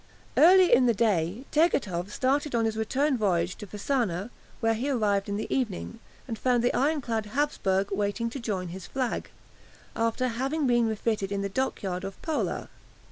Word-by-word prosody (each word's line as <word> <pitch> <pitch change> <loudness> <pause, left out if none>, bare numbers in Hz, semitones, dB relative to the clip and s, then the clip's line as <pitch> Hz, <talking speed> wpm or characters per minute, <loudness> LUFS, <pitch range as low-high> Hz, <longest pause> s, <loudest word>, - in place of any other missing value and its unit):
Early 365 +1 +7
in 250 +1 +6
the 235 - +3
day 200 +1 0
Tegethoff 205 - +1
started 275 +3 0
on 230 -1 +2
his 220 -1 -1
return 260 +5 0
voyage 180 -3 +1
to 210 - -8
Fasana, 210 -1 -1 0.3
where 225 -1 +2
he 245 +6 -2
arrived 205 -6 +1
in 200 - -1
the 215 - -3
evening, 225 -2 -3 0.3
and 225 -3 -5
found 245 -2 +2
the 245 - +2
ironclad 255 -6 0
"Hapsburg" 205 -7 0
waiting 205 +3 -1
to 275 - -5
join 195 -7 -3
his 185 +1 -8
flag, 255 -3 -2 0.7
after 230 +3 0
having 270 +6 -1
been 240 -2 +3
refitted 215 -2 -1
in 200 0 -1
the 200 - -2
dockyard 195 -5 -2
of 195 0 -7
Pola. 320 -2 -2
225 Hz, 170 wpm, -27 LUFS, 200-260 Hz, 0.7 s, Early